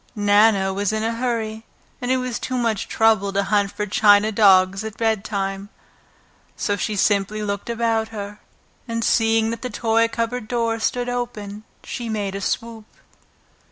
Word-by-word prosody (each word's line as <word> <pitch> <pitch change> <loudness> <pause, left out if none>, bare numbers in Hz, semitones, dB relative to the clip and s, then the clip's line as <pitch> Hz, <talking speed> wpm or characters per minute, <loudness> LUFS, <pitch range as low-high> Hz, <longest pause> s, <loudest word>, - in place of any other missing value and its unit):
Nana 205 -1 +3
was 200 +1 -1
in 215 0 -2
a 225 +1 0
hurry, 230 -2 -3 0.4
and 245 - -3
it 260 - +3
was 255 -3 -3
too 255 - -3
much 230 -4 -1
trouble 220 -3 +2
to 200 0 +1
hunt 200 0 +1
for 210 0 -3
china 210 +1 +4
dogs 195 -2 +4
at 220 -1 -7
bedtime, 200 -3 -2 0.9
so 205 - -1
she 210 +2 -2
simply 205 +1 +1
looked 200 +1 -4
about 225 -1 0
her, 205 -1 -7 0.5
and 230 -1 -2
seeing 225 0 +2
that 230 - -5
the 250 - -4
toy 230 -1 +1
cupboard 230 0 -3
door 230 -1 -1
stood 245 +2 -1
open, 220 -4 -5 0.2
she 240 -2 -5
made 205 -3 -2
a 195 - -5
swoop. 225 +2 -3
220 Hz, 160 wpm, -22 LUFS, 205-230 Hz, 0.9 s, china